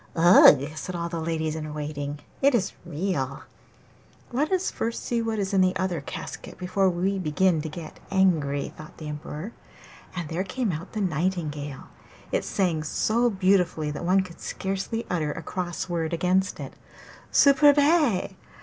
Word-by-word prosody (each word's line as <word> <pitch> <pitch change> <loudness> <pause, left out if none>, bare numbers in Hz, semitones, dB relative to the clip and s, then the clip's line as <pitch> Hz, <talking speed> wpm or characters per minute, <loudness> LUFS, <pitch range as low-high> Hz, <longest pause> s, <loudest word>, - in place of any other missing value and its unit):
'Ugh!' 160 -4 +7
said 185 +3 -5
all 170 0 -3
the 170 -1 -3
ladies 160 -1 -1
in 155 -1 -5
waiting, 145 -1 -4 0.2
'it 280 -1 +5
is 195 -5 +1 0.2
real!' 150 -5 -2 0.9
'Let 285 +7 0
us 375 -1 +2
see - - -1
first 230 +2 -3
what 225 -1 -1
is 200 -1 -2
in 190 - +4
the 185 0 +3
other 185 -5 -1
casket - - -7
before 185 +1 +1
we 190 +3 0
begin 175 0 +2
to 160 - -5
be 155 +1 -7 0.2
angry,' 160 -8 +1
thought 155 - -12
the 155 - -7
Emperor, 150 +7 -6 0.6
and 175 -3 -3
there 165 +4 -2
came 220 +3 -2
out 165 +4 -6
the 215 - -2
nightingale. 155 -5 -2 0.5
It - - +1
sang 175 -5 0
so 225 +10 +1
beautifully 185 -6 +2
that 150 - -5
one 185 +2 +3
could 175 -2 -12
scarcely 195 +4 -3
utter 155 -4 -1
a 165 - -7
cross 180 +2 -4
word 170 -2 -2
against 185 +3 +1
it. - - -7 0.6
'Superbe! 285 - +5
180 Hz, 160 wpm, -26 LUFS, 155-195 Hz, 0.9 s, Ugh